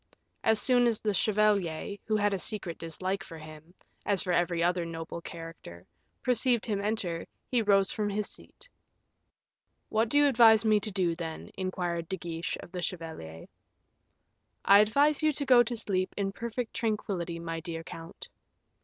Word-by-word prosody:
As 220 Hz, -1 st, +3 dB
soon 245 Hz, -2 st, +4 dB
as 225 Hz, -2 st, +1 dB
the 210 Hz, -1 st, 0 dB
chevalier, 200 Hz, -4 st, +1 dB
who 215 Hz, -, 0 dB
had 205 Hz, -1 st, +2 dB
a 195 Hz, -, -1 dB
secret 190 Hz, -4 st, -3 dB
dislike 185 Hz, +4 st, -3 dB
for 165 Hz, -4 st, -10 dB
him, 155 Hz, +2 st, -12 dB, 0.3 s
as 200 Hz, -2 st, +2 dB
for 180 Hz, -3 st, -1 dB
every 175 Hz, -1 st, +1 dB
other 175 Hz, 0 st, +1 dB
noble 165 Hz, 0 st, -6 dB
character, 165 Hz, -, -10 dB, 0.4 s
perceived 245 Hz, -1 st, +2 dB
him 205 Hz, -4 st, -1 dB
enter, 200 Hz, -6 st, -2 dB, 0.2 s
he 245 Hz, -2 st, +1 dB
rose 195 Hz, -3 st, +3 dB
from 210 Hz, -1 st, -1 dB
his 205 Hz, 0 st, -2 dB
seat. -, -, -12 dB, 1.2 s
"What 220 Hz, +1 st, +1 dB
do 290 Hz, -, +2 dB
you 290 Hz, -, +6 dB
advise 230 Hz, -5 st, +6 dB
me 215 Hz, -1 st, +4 dB
to 210 Hz, +1 st, -2 dB
do, 185 Hz, -3 st, +1 dB
then?" 165 Hz, -2 st, -6 dB
inquired 175 Hz, -3 st, -3 dB
De 190 Hz, -, -2 dB
Guiche 170 Hz, -1 st, -4 dB
of -, -, -12 dB
the 180 Hz, -1 st, -4 dB
chevalier. 160 Hz, -, -6 dB, 1.2 s
"I 200 Hz, +1 st, +8 dB
advise 280 Hz, +9 st, +3 dB
you 310 Hz, 0 st, +3 dB
to 285 Hz, +1 st, -1 dB
go 250 Hz, -2 st, +7 dB
to 240 Hz, 0 st, -1 dB
sleep 185 Hz, -4 st, -1 dB
in 195 Hz, -1 st, -1 dB
perfect 235 Hz, +2 st, -4 dB
tranquillity, 195 Hz, -6 st, -2 dB
my 165 Hz, -1 st, -4 dB
dear 165 Hz, 0 st, -5 dB
count." 165 Hz, +2 st, -10 dB
195 Hz, 170 wpm, -29 LUFS, 170-220 Hz, 1.2 s, I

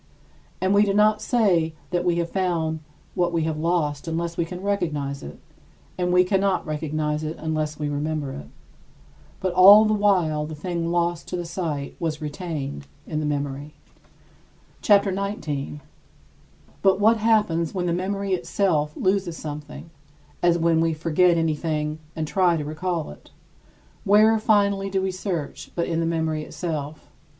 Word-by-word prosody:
And 185 Hz, +1 st, +1 dB
we 205 Hz, +1 st, +5 dB
do 200 Hz, -1 st, 0 dB
not 210 Hz, 0 st, +4 dB
say 180 Hz, -10 st, +2 dB, 0.2 s
that 175 Hz, -1 st, 0 dB
we 175 Hz, -1 st, +2 dB
have 170 Hz, 0 st, -2 dB
found 170 Hz, -4 st, -1 dB, 0.3 s
what 175 Hz, -1 st, +1 dB
we 165 Hz, -2 st, 0 dB
have 160 Hz, -1 st, -2 dB
lost 160 Hz, -3 st, -1 dB
unless 170 Hz, +1 st, -2 dB
we 170 Hz, -, 0 dB
can 180 Hz, +2 st, -8 dB
recognize 150 Hz, -9 st, -2 dB
it, 70 Hz, -, -9 dB, 0.6 s
and 180 Hz, -1 st, -1 dB
we 180 Hz, 0 st, +5 dB
cannot 195 Hz, +1 st, +1 dB
recognize 150 Hz, 0 st, -2 dB
it 155 Hz, +1 st, -4 dB
unless 155 Hz, -1 st, -2 dB
we 150 Hz, -, -2 dB
remember 145 Hz, -1 st, -2 dB
it. 70 Hz, -, -8 dB, 0.9 s
But 185 Hz, -2 st, -1 dB
all 200 Hz, +4 st, +9 dB
the 215 Hz, -, +2 dB
while 180 Hz, -8 st, +2 dB
the 155 Hz, -, -7 dB
thing 170 Hz, +1 st, -3 dB
lost 170 Hz, -1 st, -1 dB
to -, -, -4 dB
the 175 Hz, -1 st, -3 dB
sight 165 Hz, -5 st, -4 dB
was 160 Hz, -2 st, -2 dB
retained 150 Hz, -, -5 dB, 0.2 s
in 155 Hz, -, -3 dB
the 155 Hz, -, -1 dB
memory. 145 Hz, 0 st, -3 dB, 1.1 s
CHAPTER 200 Hz, -1 st, +4 dB
XIX 200 Hz, +2 st, -2 dB
28. 145 Hz, -1 st, -4 dB, 1.0 s
But 195 Hz, 0 st, +3 dB
what 220 Hz, +2 st, +5 dB
happens 210 Hz, -7 st, +1 dB
when 180 Hz, -1 st, -1 dB
the 170 Hz, -, 0 dB
memory 195 Hz, +2 st, -2 dB
itself 170 Hz, -4 st, 0 dB
loses 185 Hz, -3 st, 0 dB
something, 150 Hz, +2 st, -8 dB, 0.5 s
as 175 Hz, -1 st, +3 dB
when 165 Hz, -1 st, +2 dB
we 165 Hz, 0 st, +1 dB
forget 170 Hz, +2 st, +3 dB
anything 155 Hz, -1 st, -1 dB, 0.2 s
and 155 Hz, -1 st, -3 dB
try 180 Hz, 0 st, +2 dB
to 150 Hz, -, -4 dB
recall 165 Hz, -, -3 dB
it? 75 Hz, -, -15 dB, 0.7 s
Where, 215 Hz, +2 st, +5 dB
finally, 200 Hz, -2 st, +2 dB
do 195 Hz, 0 st, 0 dB
we 190 Hz, 0 st, -1 dB
search, 180 Hz, -5 st, -4 dB
but 170 Hz, -, 0 dB
in 165 Hz, -1 st, -1 dB
the 165 Hz, -, 0 dB
memory 160 Hz, -2 st, -1 dB
itself? 155 Hz, -2 st, -5 dB
170 Hz, 160 wpm, -24 LUFS, 155-190 Hz, 1.1 s, all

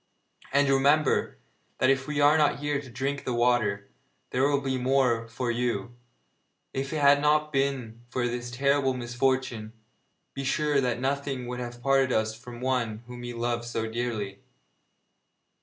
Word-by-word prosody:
And 140 Hz, +1 st, +3 dB
remember 140 Hz, +2 st, +3 dB, 0.4 s
that 130 Hz, -, +4 dB
if 135 Hz, 0 st, 0 dB
we 150 Hz, 0 st, -2 dB
are 145 Hz, +1 st, +6 dB
not 150 Hz, -2 st, +3 dB
here 145 Hz, 0 st, -1 dB
to 135 Hz, -, -12 dB
drink 135 Hz, +3 st, -3 dB
the 125 Hz, -, -2 dB
water, 120 Hz, -5 st, +1 dB, 0.4 s
there 130 Hz, +3 st, +2 dB
will 140 Hz, -1 st, +2 dB
be 135 Hz, -1 st, -1 dB
the 125 Hz, -, -4 dB
more 125 Hz, -3 st, +2 dB
for 120 Hz, +1 st, -2 dB
you! 120 Hz, -1 st, -2 dB, 0.8 s
If 135 Hz, +1 st, -3 dB
it 155 Hz, -, -2 dB
had 145 Hz, 0 st, +6 dB
not 150 Hz, +1 st, +2 dB
been 135 Hz, -5 st, -1 dB
for 120 Hz, 0 st, -1 dB
this 120 Hz, 0 st, -4 dB
terrible 135 Hz, +1 st, +1 dB
misfortune, 120 Hz, -2 st, -1 dB, 0.6 s
be 135 Hz, -, -4 dB
sure 145 Hz, +1 st, +1 dB
that 125 Hz, -2 st, 0 dB
nothing 135 Hz, -1 st, -2 dB
would 125 Hz, 0 st, -5 dB
have 120 Hz, 0 st, -7 dB
parted 135 Hz, -1 st, +3 dB
us 110 Hz, -1 st, +1 dB
from 120 Hz, +2 st, -10 dB
one 120 Hz, -4 st, -1 dB
whom 125 Hz, 0 st, -9 dB
we 120 Hz, 0 st, -5 dB
love 120 Hz, 0 st, -1 dB
so 115 Hz, -1 st, -3 dB
dearly.' 110 Hz, -4 st, -3 dB
125 Hz, 165 wpm, -27 LUFS, 120-140 Hz, 0.8 s, are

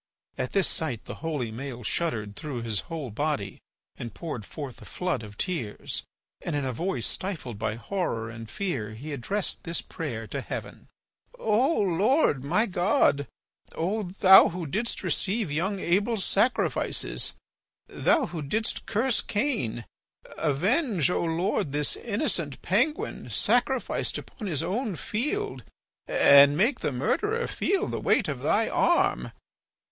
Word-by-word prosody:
At 125 Hz, -, -3 dB
this 195 Hz, -3 st, +3 dB
sight 135 Hz, -9 st, -3 dB
the -, -, -6 dB
holy 150 Hz, -8 st, -2 dB
Maël 125 Hz, 0 st, -6 dB
shuddered 110 Hz, -12 st, -1 dB
through 130 Hz, -4 st, -5 dB
his 110 Hz, -4 st, 0 dB
whole 155 Hz, -7 st, -4 dB
body 130 Hz, -5 st, -2 dB, 0.4 s
and 115 Hz, -4 st, -7 dB
poured 145 Hz, -10 st, -5 dB
forth 140 Hz, -6 st, -7 dB
a -, -, -11 dB
flood 180 Hz, -8 st, -2 dB
of 105 Hz, -2 st, -10 dB
tears. 160 Hz, -, -2 dB, 0.4 s
And 165 Hz, -, -3 dB
in 145 Hz, -2 st, 0 dB
a 130 Hz, -, -1 dB
voice 175 Hz, +10 st, -1 dB
stifled 150 Hz, -, -3 dB
by 110 Hz, -1 st, -1 dB
horror 115 Hz, -, -2 dB
and 115 Hz, -1 st, -8 dB
fear 130 Hz, -, -3 dB
he 145 Hz, +7 st, -6 dB
addressed 195 Hz, +10 st, -2 dB
this 165 Hz, 0 st, -2 dB
prayer 120 Hz, -9 st, -5 dB
to -, -, -4 dB
heaven: -, -, -7 dB, 0.5 s
"O 255 Hz, -, +2 dB
Lord, 195 Hz, -, +3 dB
my 210 Hz, +11 st, +2 dB
God, 180 Hz, -, +2 dB, 0.5 s
O 195 Hz, +7 st, 0 dB
thou 190 Hz, 0 st, +7 dB
who 175 Hz, 0 st, -4 dB
didst 215 Hz, +11 st, -2 dB
receive 190 Hz, +2 st, 0 dB
young 190 Hz, +7 st, 0 dB
Abel's 200 Hz, +4 st, +1 dB
sacrifices, 230 Hz, +5 st, +1 dB, 0.5 s
thou 320 Hz, -6 st, +2 dB
who 175 Hz, -7 st, -5 dB
didst 215 Hz, +11 st, -2 dB
curse 230 Hz, +3 st, +1 dB
Cain, 205 Hz, -, -1 dB, 0.5 s
avenge, 180 Hz, -, +1 dB
O -, -, +1 dB
Lord, 170 Hz, -1 st, 0 dB
this 150 Hz, 0 st, 0 dB
innocent 200 Hz, -, -2 dB
penguin 245 Hz, -, 0 dB
sacrificed 245 Hz, +1 st, +1 dB
upon 215 Hz, -, -7 dB
his 160 Hz, -5 st, 0 dB
own 205 Hz, +3 st, -1 dB
field 210 Hz, -, -2 dB, 0.4 s
and 140 Hz, +1 st, +7 dB
make 235 Hz, -, +3 dB
the -, -, -1 dB
murderer 420 Hz, -, 0 dB
feel 395 Hz, -, 0 dB
the -, -, -3 dB
weight -, -, +3 dB
of -, -, -3 dB
thy -, -, +2 dB
arm. -, -, +2 dB
170 Hz, 140 wpm, -27 LUFS, 135-210 Hz, 0.5 s, thou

